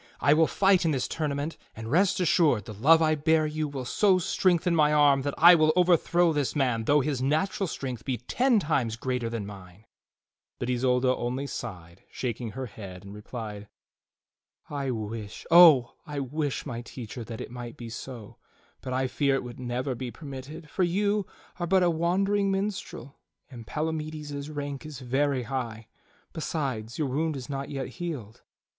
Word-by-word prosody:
I 145 Hz, -, +5 dB
will 160 Hz, +1 st, +4 dB
fight 195 Hz, -2 st, +3 dB
in 165 Hz, -, +2 dB
this 135 Hz, -4 st, 0 dB
tournament; 150 Hz, 0 st, -3 dB, 0.2 s
and 110 Hz, 0 st, -7 dB
rest 185 Hz, +5 st, +3 dB
assured, 155 Hz, -, +3 dB
the 110 Hz, -, -7 dB
love 160 Hz, +10 st, +5 dB
I 155 Hz, 0 st, +3 dB
bear 155 Hz, +1 st, +2 dB
you 155 Hz, 0 st, -2 dB
will 135 Hz, -3 st, -5 dB
so 190 Hz, -, +3 dB
strengthen 175 Hz, -1 st, +2 dB
my 150 Hz, -2 st, +4 dB
arm 145 Hz, -2 st, +5 dB
that 140 Hz, +1 st, -3 dB
I 175 Hz, +2 st, +9 dB
will 155 Hz, -2 st, +5 dB
overthrow 175 Hz, -1 st, +3 dB
this 145 Hz, -6 st, -1 dB
man 125 Hz, -6 st, +1 dB
though 145 Hz, +3 st, +4 dB
his 135 Hz, -2 st, -2 dB
natural 160 Hz, +8 st, 0 dB
strength 130 Hz, -7 st, -5 dB
be 130 Hz, -3 st, -2 dB
ten 245 Hz, -, +2 dB
times 135 Hz, -, 0 dB
greater 125 Hz, -1 st, -2 dB
than 115 Hz, -3 st, -4 dB
mine." 100 Hz, 0 st, -12 dB, 0.7 s
But 125 Hz, -, -2 dB
Isolda 125 Hz, +1 st, +2 dB
only 125 Hz, +3 st, -3 dB
sighed 90 Hz, -10 st, -7 dB
shaking 120 Hz, -3 st, -4 dB
her 130 Hz, +2 st, -4 dB
head, 100 Hz, -5 st, -10 dB
and 100 Hz, -, -9 dB
replied: 105 Hz, -1 st, -7 dB, 1.0 s
"I 140 Hz, -2 st, -2 dB
wish, 110 Hz, -2 st, -5 dB
Oh! 160 Hz, -8 st, +8 dB
I 145 Hz, -1 st, -4 dB
wish, 140 Hz, +1 st, -2 dB
my 120 Hz, -5 st, -5 dB
teacher, 120 Hz, -1 st, -8 dB
that 115 Hz, -1 st, -7 dB
it -, -, -7 dB
might 120 Hz, -1 st, -8 dB
be 115 Hz, -1 st, -8 dB
so; 115 Hz, -2 st, -8 dB, 0.4 s
but 130 Hz, -, -5 dB
I 130 Hz, +1 st, +1 dB
fear 140 Hz, +1 st, +1 dB
it 135 Hz, -, -2 dB
would 120 Hz, 0 st, -9 dB
never 125 Hz, +2 st, -2 dB
be 125 Hz, 0 st, -5 dB
permitted, 145 Hz, +3 st, -9 dB
for 185 Hz, -, -3 dB
you 200 Hz, +3 st, +1 dB, 0.3 s
are 175 Hz, -, -1 dB
but 190 Hz, +1 st, +4 dB
a 175 Hz, -, +4 dB
wandering 195 Hz, +5 st, +1 dB
minstrel 195 Hz, -, -4 dB, 0.3 s
and 115 Hz, -3 st, -10 dB
Palamides's 155 Hz, -2 st, -4 dB
rank 145 Hz, -2 st, -5 dB
is 155 Hz, -3 st, -8 dB
very 135 Hz, +1 st, 0 dB
high. 115 Hz, -3 st, -4 dB, 0.5 s
Besides, 130 Hz, -8 st, -3 dB
your 150 Hz, -, 0 dB
wound 155 Hz, +4 st, -1 dB
is 130 Hz, -1 st, -7 dB
not 140 Hz, -1 st, -4 dB
yet 135 Hz, -2 st, -4 dB
healed." 140 Hz, -, -6 dB
140 Hz, 175 wpm, -27 LUFS, 120-160 Hz, 1.0 s, I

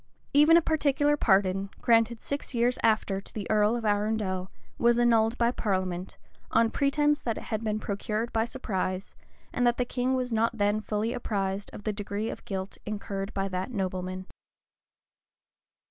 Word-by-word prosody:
Even 300 Hz, +4 st, +7 dB
a 340 Hz, -, +3 dB
particular 295 Hz, -2 st, +2 dB
pardon, 195 Hz, -5 st, +2 dB
granted 230 Hz, 0 st, +3 dB
six 280 Hz, -2 st, -3 dB
years 240 Hz, +2 st, +2 dB
after 210 Hz, -3 st, +2 dB
to -, -, -16 dB
the 210 Hz, -3 st, -4 dB
earl 210 Hz, +1 st, +3 dB
of 235 Hz, -2 st, -3 dB
Arundel, 205 Hz, -3 st, 0 dB, 0.3 s
was 235 Hz, 0 st, +4 dB
annulled 230 Hz, -1 st, +3 dB
by 235 Hz, 0 st, +3 dB
parliament, 185 Hz, -5 st, -2 dB, 0.3 s
on 230 Hz, 0 st, +3 dB
pretence 295 Hz, +1 st, +2 dB
that 230 Hz, -2 st, -2 dB
it -, -, -6 dB
had 220 Hz, -1 st, -3 dB
been 215 Hz, -1 st, 0 dB
procured 215 Hz, +3 st, -3 dB
by 225 Hz, -, +2 dB
surprise, 190 Hz, -6 st, -3 dB, 0.4 s
and 245 Hz, 0 st, +2 dB
that 240 Hz, -, +2 dB
the 250 Hz, -, +1 dB
king 255 Hz, +1 st, 0 dB
was 250 Hz, -2 st, -1 dB
not 230 Hz, +1 st, +1 dB
then 205 Hz, +1 st, +1 dB
fully 215 Hz, +2 st, -1 dB
apprized 195 Hz, -3 st, -2 dB
of 205 Hz, -, -10 dB
the 215 Hz, -, -1 dB
degree 205 Hz, +1 st, -3 dB
of -, -, -9 dB
guilt 190 Hz, -1 st, -5 dB
incurred 200 Hz, -1 st, -4 dB
by 195 Hz, 0 st, 0 dB
that 185 Hz, +2 st, -3 dB
nobleman. 185 Hz, -3 st, -3 dB
215 Hz, 165 wpm, -28 LUFS, 195-240 Hz, 0.4 s, Even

